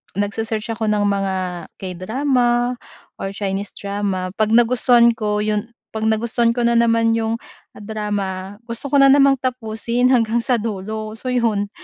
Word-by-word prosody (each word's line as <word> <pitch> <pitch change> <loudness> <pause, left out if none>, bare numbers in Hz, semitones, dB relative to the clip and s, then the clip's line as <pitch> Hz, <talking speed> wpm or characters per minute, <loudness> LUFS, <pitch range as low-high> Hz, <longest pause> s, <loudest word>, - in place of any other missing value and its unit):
nagse-search 215 +2 -2
ako 220 -1 -2
ng 210 -1 +2
mga 195 -1 -1 0.4
K-drama 240 +6 0 0.5
or 195 - -3
Chinese 200 0 -3
drama, 200 -2 -3
'pag 215 - +3
nagustuhan 240 0 +5
ko 210 -2 -1
'yun 210 +1 -1 0.2
'pag 220 0 -2
nagustuhan 230 +1 +1
ko 240 - 0
na 235 0 +3
naman 230 -1 +3
'yung 225 0 0 0.4
drama, 205 -2 -4
gusto 235 +4 -6
ko 285 - -1
na 275 -1 +7
namang 275 -1 +5
tapusin 240 0 -1
hanggang 235 -2 +2
sa 245 +1 +1
dulo 215 0 -4
so, 255 - -8
'yun. 215 -4 0
220 Hz, 145 wpm, -20 LUFS, 205-235 Hz, 0.5 s, na